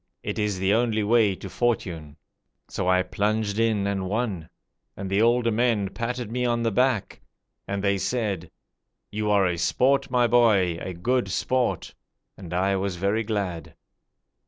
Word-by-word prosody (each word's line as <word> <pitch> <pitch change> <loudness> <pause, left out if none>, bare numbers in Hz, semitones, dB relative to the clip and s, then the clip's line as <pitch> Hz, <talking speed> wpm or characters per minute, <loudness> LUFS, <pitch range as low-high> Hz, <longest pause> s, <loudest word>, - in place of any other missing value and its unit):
It - - -3
is 105 -2 0
the 95 +2 +1
only 110 -2 +1
way 105 -2 +3
to 95 - -9
fortune.' 90 -9 -2 0.5
So - - -3
I 90 0 +4
plunged 105 +1 -1
in 110 -3 +1
and 95 -2 -2
won; 100 -7 -2 0.5
and 95 -1 -5
the 100 +2 +2
older 120 0 +3
men 110 -3 +1
patted 115 +1 -4
me 125 +1 -1
on 120 -1 +1
the 115 - +1
back, 125 -1 0 0.5
And 100 0 -3
they 100 -1 +1
said, 100 -5 -2 0.6
'You 105 0 -2
are 100 -2 +4
a 90 -2 -1
sport, 125 +11 +2
my 125 -1 +3
boy, 105 -8 +3
a 95 - -5
good 120 +4 0
sport!' 125 +6 -1 0.4
And 90 -4 -10
I 95 +2 +1
was 95 -1 -2
very 100 +5 0
glad. 100 -7 -3
105 Hz, 160 wpm, -25 LUFS, 95-115 Hz, 0.6 s, I